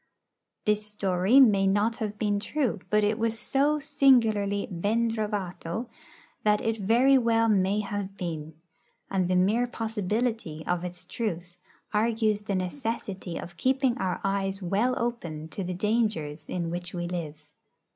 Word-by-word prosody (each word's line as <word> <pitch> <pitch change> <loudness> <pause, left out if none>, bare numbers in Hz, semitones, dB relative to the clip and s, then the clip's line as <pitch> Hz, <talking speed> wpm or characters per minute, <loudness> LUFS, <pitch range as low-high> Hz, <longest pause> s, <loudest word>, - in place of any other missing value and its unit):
This 210 0 +2
story 195 +3 +3
may 200 -7 +6
not 205 +4 +2
have 210 -2 -4
been 205 -1 0
true; 260 +2 -1
but 210 0 +3
it 210 +2 +1
was 225 0 0
so 280 +6 +2
singularly 220 -8 +3
ben 220 +6 +1
trovato 210 0 -3 0.5
that 210 0 +3
it 225 0 -1
very 240 +7 +4
well 230 -1 +3
may 200 0 +2
have 200 -1 -5
been; 160 -3 -5 0.6
and 185 -2 +1
the 185 - +1
mere 210 +7 +3
possibility 220 -6 -2
of 175 0 -1
its 180 0 -5
truth 175 -6 -4 0.4
argues 215 -1 +1
the 205 -2 -2
necessity 190 -2 -3
of 175 0 -8
keeping 260 +4 +2
our 185 -4 -1
eyes 195 0 0
well 205 +7 +1
open 170 -10 -3
to 195 - -4
the 180 0 -3
dangers 185 -8 -1
in 170 -2 -2
which 175 +1 -5
we 175 0 -2
live. 155 -4 -5
205 Hz, 145 wpm, -27 LUFS, 180-230 Hz, 0.6 s, may